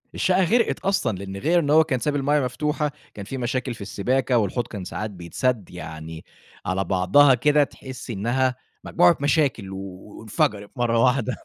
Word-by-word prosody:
الشقة 185 Hz, 0 st, +2 dB
غرقت 230 Hz, +6 st, +2 dB
أصلًا، 125 Hz, -, 0 dB
لأن 95 Hz, 0 st, -7 dB
غير 170 Hz, -, +2 dB
إن 145 Hz, -3 st, -2 dB
هو 160 Hz, +1 st, +6 dB
كان 130 Hz, -6 st, -1 dB
سايب 145 Hz, +5 st, -1 dB
المَيّة 145 Hz, +2 st, +2 dB
مفتوحة، 150 Hz, +3 st, -1 dB, 0.2 s
كان 100 Hz, -2 st, -8 dB
في 135 Hz, -, -6 dB
مشاكل 125 Hz, 0 st, -2 dB
في 105 Hz, -, -13 dB
السباكة 125 Hz, +5 st, 0 dB
والحوض 115 Hz, +3 st, -1 dB
كان 100 Hz, -4 st, -7 dB
ساعات 105 Hz, +3 st, -4 dB
بيتسدّ 100 Hz, +5 st, -2 dB
يعني 80 Hz, -1 st, -8 dB, 0.4 s
على 95 Hz, +2 st, 0 dB
بعضها 100 Hz, +11 st, +4 dB
كده، 145 Hz, +4 st, +3 dB
تحس 130 Hz, -2 st, -9 dB
إنها 120 Hz, +5 st, 0 dB, 0.3 s
مجموعة 90 Hz, -, +4 dB
مشاكل 140 Hz, -9 st, +1 dB
وانفجرت 100 Hz, +2 st, -3 dB
مرّه 115 Hz, -2 st, +1 dB
واحدة، 125 Hz, -1 st, +1 dB
120 Hz, 165 wpm, -23 LUFS, 100-145 Hz, 0.4 s, هو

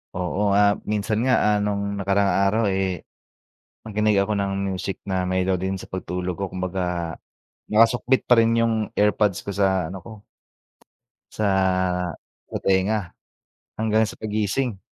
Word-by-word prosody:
Oo, 100 Hz, +3 st, 0 dB
ah, 100 Hz, 0 st, +4 dB
minsan 105 Hz, +1 st, 0 dB
nga, 130 Hz, -, +4 dB
ah, 105 Hz, 0 st, +3 dB
nung 100 Hz, -1 st, -2 dB
nakaraang 100 Hz, 0 st, +2 dB
araw, 110 Hz, +3 st, +1 dB
eh, 95 Hz, -2 st, -1 dB, 0.8 s
nakinig 105 Hz, -1 st, +1 dB
ako 100 Hz, +2 st, +1 dB
ng 100 Hz, -1 st, -1 dB, 0.2 s
music 95 Hz, 0 st, -4 dB
na 95 Hz, -2 st, -1 dB
melody 95 Hz, 0 st, 0 dB
sa -, -, -9 dB
pagtulog 90 Hz, -1 st, -4 dB
ko. 95 Hz, +1 st, -4 dB
Kumbaga, 90 Hz, -2 st, -3 dB, 0.5 s
nakasukbit 115 Hz, +4 st, +3 dB
pa 125 Hz, -, +6 dB
rin 115 Hz, 0 st, +4 dB
yung 115 Hz, 0 st, +2 dB, 0.2 s
AirPods 105 Hz, -2 st, +2 dB
ko -, -, -8 dB
sa 95 Hz, -4 st, +1 dB
ano 95 Hz, -, -6 dB
ko 110 Hz, -3 st, -11 dB, 1.1 s
sa 105 Hz, -, -1 dB, 1.0 s
sa -, -, -3 dB
tenga 95 Hz, 0 st, +1 dB, 0.7 s
hanggang 110 Hz, 0 st, +2 dB
sa -, -, -9 dB
paggising. 110 Hz, +1 st, -1 dB
100 Hz, 135 wpm, -23 LUFS, 95-110 Hz, 1.1 s, pa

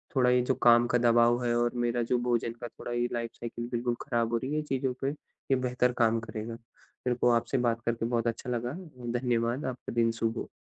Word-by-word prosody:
थोड़ा 125 Hz, -2 st, +4 dB
ये 125 Hz, 0 st, +4 dB
जो 125 Hz, +2 st, +1 dB
काम 120 Hz, 0 st, +7 dB
का 125 Hz, -, +2 dB
दबाव 120 Hz, 0 st, +4 dB
है 120 Hz, -1 st, +1 dB
और 120 Hz, 0 st, +1 dB
मेरा 120 Hz, 0 st, 0 dB
जो 125 Hz, -, +4 dB
भोजन 120 Hz, -1 st, +1 dB
का 120 Hz, -, -4 dB
थोड़ा 120 Hz, -, -8 dB
ये 120 Hz, 0 st, +1 dB
लाइफ़ 115 Hz, -1 st, -2 dB
साइकिल 120 Hz, 0 st, -5 dB
बिल्कुल 120 Hz, 0 st, 0 dB
खराब 115 Hz, -1 st, 0 dB
हो -, -, +3 dB
रही 130 Hz, +4 st, -4 dB
है, -, -, 0 dB
इन -, -, -3 dB
चीज़ों 135 Hz, -2 st, -1 dB
पे 135 Hz, -, +1 dB
ये 140 Hz, -2 st, -4 dB
बेहतर 125 Hz, -1 st, +1 dB
काम 115 Hz, -1 st, +3 dB
करेगा। 115 Hz, 0 st, -6 dB
मेरे 120 Hz, +1 st, -6 dB
को 120 Hz, 0 st, +2 dB
आपसे 120 Hz, +3 st, +1 dB
बात 120 Hz, -2 st, +1 dB
करके 115 Hz, -1 st, 0 dB
बहुत 120 Hz, 0 st, 0 dB
अच्छा 115 Hz, +2 st, -3 dB
लगा। 120 Hz, 0 st, -1 dB, 0.5 s
धन्यवाद। 120 Hz, +1 st, 0 dB
आपका 130 Hz, -1 st, -5 dB
दिन 115 Hz, -1 st, +3 dB
शुभ 115 Hz, 0 st, 0 dB
हो। -, -, -4 dB
120 Hz, 230 wpm, -29 LUFS, 115-125 Hz, 0.5 s, काम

